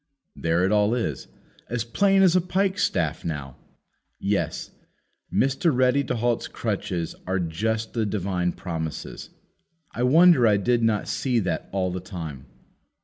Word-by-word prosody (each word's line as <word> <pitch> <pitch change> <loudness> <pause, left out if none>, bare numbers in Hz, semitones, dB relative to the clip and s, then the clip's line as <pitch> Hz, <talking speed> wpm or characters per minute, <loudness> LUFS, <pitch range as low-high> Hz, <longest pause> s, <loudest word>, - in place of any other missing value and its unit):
There 85 +2 +1
it 95 - +1
all 105 +2 +3
is, 80 - -3 0.4
as 120 -2 -1
plain 195 - +3
as 185 -2 +5
a 180 - +5
pike 190 +2 0
staff 80 - 0
now! 75 -6 -5 0.6
Yes; 100 0 -2 0.6
Mr. 135 +5 +2
Ready 130 +1 +3
to 125 - -2
halt's 120 0 0
crutches 95 -6 -3
are 95 +1 0
just 110 +7 -2
the 115 - 0
divine 90 -3 -1
promises. 80 -3 -5 0.6
I 120 - -5
wonder 155 0 +6
I 105 -2 +4
did 120 +4 +1
not 110 -2 +1
see 125 -3 0
that 85 -4 -3
all 95 -2 0
the 90 - -3
time. 80 -8 -7
105 Hz, 145 wpm, -25 LUFS, 90-125 Hz, 0.6 s, wonder